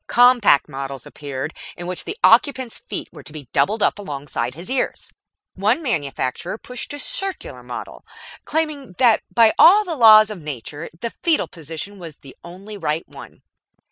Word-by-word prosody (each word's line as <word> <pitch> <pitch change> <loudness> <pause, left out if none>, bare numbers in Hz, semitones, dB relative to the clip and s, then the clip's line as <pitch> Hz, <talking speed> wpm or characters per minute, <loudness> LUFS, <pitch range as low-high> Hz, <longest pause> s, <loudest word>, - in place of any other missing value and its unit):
Compact 245 - +5
models 135 -1 -6
appeared, 145 +1 -6 0.2
in 175 - -7
which 180 0 -4
the 405 - -5
occupant's 260 -5 +3
feet - - -6
were - - -12
to - - -7
be 150 -4 -10
doubled 200 - +2
up - - +1
alongside 140 -8 -4
his 170 +3 -9
ears. 260 +1 -2 0.4
One 215 - +1
manufacturer 160 - -2
pushed 250 +4 -7
a - - -5
circular 390 +10 -2
model, - - -8 0.4
claiming 305 - -2
that 235 -4 +4
by 230 -2 +5
all 415 +4 +8
the 340 -3 -3
laws 215 -4 +7
of 195 -5 -8
nature 145 +2 -7
the 235 - -3
foetal 330 -3 +1
position 165 +5 -7
was 165 -5 -10
the 135 - -15
only 195 +5 -10
right 160 -2 -2
one. - - -13
200 Hz, 165 wpm, -21 LUFS, 150-250 Hz, 0.4 s, all